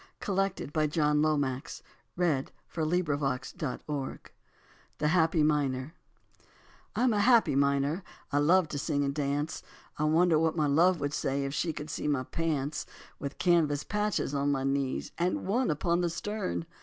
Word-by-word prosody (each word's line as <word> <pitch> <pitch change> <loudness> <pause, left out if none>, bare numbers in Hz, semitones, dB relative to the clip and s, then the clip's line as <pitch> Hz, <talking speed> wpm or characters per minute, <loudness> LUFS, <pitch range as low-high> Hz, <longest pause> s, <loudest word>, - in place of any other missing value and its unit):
[Footnote 195 -1 0
13: - - -5
To 155 0 +1
tune 155 +1 0 0.2
of 155 -2 +2
Pop 130 -1 -1 0.6
Goes 160 -7 +1 0.2
the 150 -5 -1
Weasel.] 145 -3 -3 0.8
THE 150 - 0
HAPPY 165 -1 +3
MINER 145 -1 0 1.0
I'm 250 -1 +3
a 210 - +1
happy 230 - +5
miner, 140 +4 +2 0.3
I 145 - +2
love 170 +4 +4
to 145 - -3
sing 145 +1 0
and 140 0 -1
dance. 145 +1 -2 0.4
I 150 - +2
wonder 160 +1 +4
what 160 +1 +1
my 155 - +2
love 165 +5 +4
would 145 0 -1
say 140 -1 -1
If 135 - -3
she 165 +2 0
could 150 0 -7
see 155 - -3
my 140 -3 +1
pants 150 -2 -2 0.3
With 140 0 -5
canvas 155 -5 +2
patches 210 -7 -1
on 140 0 +1
my 135 -1 0
knees 135 -1 -1
And 175 +1 0
one 240 +7 +1
upon 170 +3 +1
the 175 - +1
stern? 170 - -3
150 Hz, 165 wpm, -29 LUFS, 140-170 Hz, 1.0 s, happy